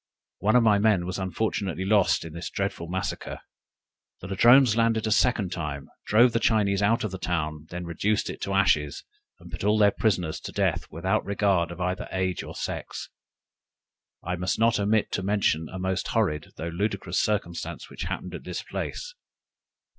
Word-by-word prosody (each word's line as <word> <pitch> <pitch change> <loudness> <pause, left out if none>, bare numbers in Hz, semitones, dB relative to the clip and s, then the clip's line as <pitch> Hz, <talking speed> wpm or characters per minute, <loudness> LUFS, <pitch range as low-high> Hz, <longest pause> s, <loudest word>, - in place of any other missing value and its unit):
One 105 +5 +2
of 125 - +6
my 105 -2 +4
men 100 -4 +3
was 90 +2 -4
unfortunately 95 -1 -2
lost 100 -4 +3
in 80 - -8
this 85 +1 -5
dreadful 100 -4 -3
massacre! 95 +2 -4 0.8
The 90 - -8
Ladrones 120 +4 +6
landed 115 -1 +2
a 110 - 0
second 105 -4 +2
time, 75 -6 -5 0.2
drove 120 +3 +5
the 115 - +1
Chinese 100 -3 +2
out 115 +4 +2
of 110 - -2
the 95 - -6
town, 75 -3 -2
then 90 0 -5
reduced 100 +5 0
it - - -6
to 100 - -2
ashes, 75 -7 +2 0.4
and - - -13
put - - -6
all 105 +1 +3
their 105 -1 +5
prisoners 90 -8 0
to - - -7
death, - - 0
without 95 +6 0
regarding 95 -4 0
either 90 +1 -2
age 95 -1 -1
or - - -9
sex! - - -5 1.1
I 90 +1 -2
must 90 +1 -1
not 115 0 +3
omit 105 +1 +1
to - - -1
mention 95 -5 +1
a 95 - -7
most 95 0 -1
horrid 85 -10 0
(though 85 - -4
ludicrous) 100 -1 -1
circumstance 85 -6 -2
which - - -5
happened - - -5
at - - -7
this - - -5
place. - - -5
95 Hz, 175 wpm, -26 LUFS, 90-110 Hz, 1.1 s, of